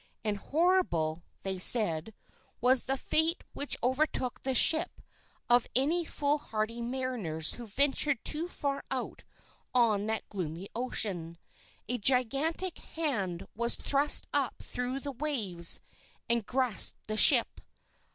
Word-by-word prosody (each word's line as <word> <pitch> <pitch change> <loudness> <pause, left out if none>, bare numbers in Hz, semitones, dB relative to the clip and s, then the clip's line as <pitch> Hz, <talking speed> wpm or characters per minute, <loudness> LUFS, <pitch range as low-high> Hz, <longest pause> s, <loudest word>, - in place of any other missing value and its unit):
And 210 -2 -1
horrible, 280 - 0 0.2
they 190 -1 -2
said, 195 -2 +3 0.4
was 250 +1 +3
the 270 +1 +1
fate 320 +6 +1
which 285 - -2
overtook 260 -1 -1
the 265 -1 -2
ship 320 +5 +3 0.5
of 245 0 +3
any 320 +7 +2
foolhardy 235 -7 -3
mariners 235 -11 0
who 240 -1 -10
ventured 280 +3 0
too 320 +3 +3
far 280 -5 -4
out - - -5 0.5
on 215 -4 +2
that 220 0 -3
gloomy 180 -1 -6
ocean. 190 -9 -2 0.5
A 245 +2 -3
gigantic 275 - +1
hand 205 - -3
was 235 +2 +1
thrust 285 +1 +4
up 280 -4 -2
through 250 +2 -4
the 285 - -5
waves, 225 - +1 0.5
and 235 -3 -1
grasped 255 -5 +1
the 215 - -4
ship. - - +5
245 Hz, 120 wpm, -29 LUFS, 210-285 Hz, 0.5 s, ship